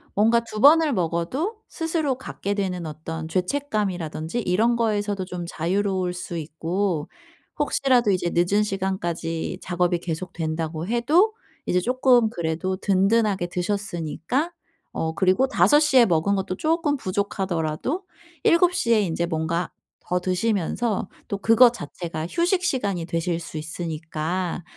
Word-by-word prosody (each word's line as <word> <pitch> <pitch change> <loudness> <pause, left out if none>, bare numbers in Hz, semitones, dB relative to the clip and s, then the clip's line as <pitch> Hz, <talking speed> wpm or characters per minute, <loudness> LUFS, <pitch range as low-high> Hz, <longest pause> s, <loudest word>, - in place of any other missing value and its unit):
뭔가 225 +3 +4
2 225 -2 -7
번을 305 +2 +6
먹어도 185 - -1
스스로 325 -4 -1
갖게 205 -5 -4
되는 185 -4 -2
어떤 160 +1 -6
죄책감이라든지 185 - -2
이런 220 +5 +2
거에서도 205 -4 0
좀 180 -1 -5
자유로울 185 +2 -1
수 180 -1 -5
있고. 165 +2 -2 0.5
혹시라도 255 -6 +3
이제 180 -2 0
늦은 180 +5 +2
시간까지 185 -4 -2
작업이 175 0 +1
계속된다고 165 -2 -4
해도 300 - +3 0.3
이제 180 - +2
쪼끔 250 0 +3
그래도 170 0 -2
든든하게 195 0 +2
드셨으니까 185 - -2 0.4
어 160 0 -2
그리고 190 +8 +3
5 295 +2 +5
시에 270 -5 +5
먹은 175 +2 +2
것도 190 -1 -2
쪼끔 315 -2 +1
부족하더라도 190 - -2 0.4
7 350 +1 +4
시에 230 -7 +3
인제 170 -3 -1
뭔가 165 +1 -2 0.3
더 180 - -1
드시면서 195 +3 -1 0.2
또 200 - -3
그것 230 +4 +6
자체가 165 -3 -5
휴식 355 - +1
시간이 200 - -1
되실 170 0 -1
수 160 -1 -7
있으니까 160 +2 -3
190 Hz, 295 characters per minute, -24 LUFS, 170-235 Hz, 0.5 s, 번을